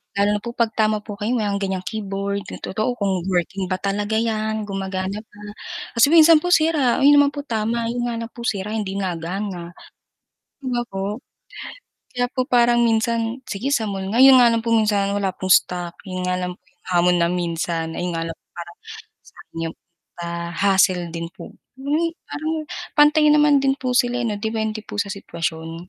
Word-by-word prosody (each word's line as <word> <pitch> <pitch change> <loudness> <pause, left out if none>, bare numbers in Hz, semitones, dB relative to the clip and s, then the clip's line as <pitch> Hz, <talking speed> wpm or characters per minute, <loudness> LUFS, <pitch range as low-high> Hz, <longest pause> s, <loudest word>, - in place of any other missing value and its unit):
lalo 200 +1 +2
na - - -1
po 235 - -4
'pag 230 -2 -1
tama 215 -1 +2
po 210 0 -8
kayo 210 +3 -3
may 225 -4 0
ganyang 190 -2 -2
keyboard 200 -1 -3 0.2
totoo 220 +5 -2
kung 190 -3 0
working 185 +2 -1
ba 185 - 0
talaga 205 +3 -1
'yan 220 -1 -1
gumagana 195 +1 -4
pa. 205 -2 -20 0.6
Kasi 230 +3 +6
minsan 325 -1 +7
po 355 - -1
sira 310 -7 +3
'yon 285 +1 +6
naman 285 - +1
po 290 - -7
tama 230 -2 -1
'yon 240 +1 -2
nga 240 -1 -2
lang 230 0 -6
po 235 - -8
sira 210 -1 -2
hindi 200 -2 -3
nagana, 180 0 -4 0.9
'di - - -5
ba 240 - +1
po. 195 +4 -4 1.0
Kaya 245 0 +2
po 255 -1 -1
parang 240 -1 +4
minsan, 230 +2 0
sige 245 +2 -4
sa 225 - +1
mall 195 -1 -4
nga, 245 - +5
yun 265 -1 +9
nga 245 - +7
lang 230 -1 0
po 230 - -1
minsan 210 -3 +2
wala 195 -2 -1
pong 185 - -4
stock, 175 -1 +2
yun 185 0 -4
nga 180 0 0
lang 180 0 -3
po - - -49
yung - - -38
hamon 180 0 +4
na 170 - +3
minsan 170 -2 -2
ayun 175 +1 -3
nga 165 - -2
lang 165 -1 -6 0.2
parang 170 0 -8 0.8
yung, 165 0 -3 0.5
ah 170 0 -4
hassle 185 -1 +2
din 165 0 -5
po - - -10 0.3
yung 300 +5 0 0.2
parang 310 +2 -3 0.4
pantay 300 +1 +6
naman 295 -2 +5
din 270 0 +1
po 255 -1 -2
sila 245 0 +2
ano 230 -3 -1
dipende 220 0 -2
po 205 - -9
sa 200 - +1
sitwasyon. 165 -2 -5
210 Hz, 190 wpm, -21 LUFS, 185-240 Hz, 1.0 s, yun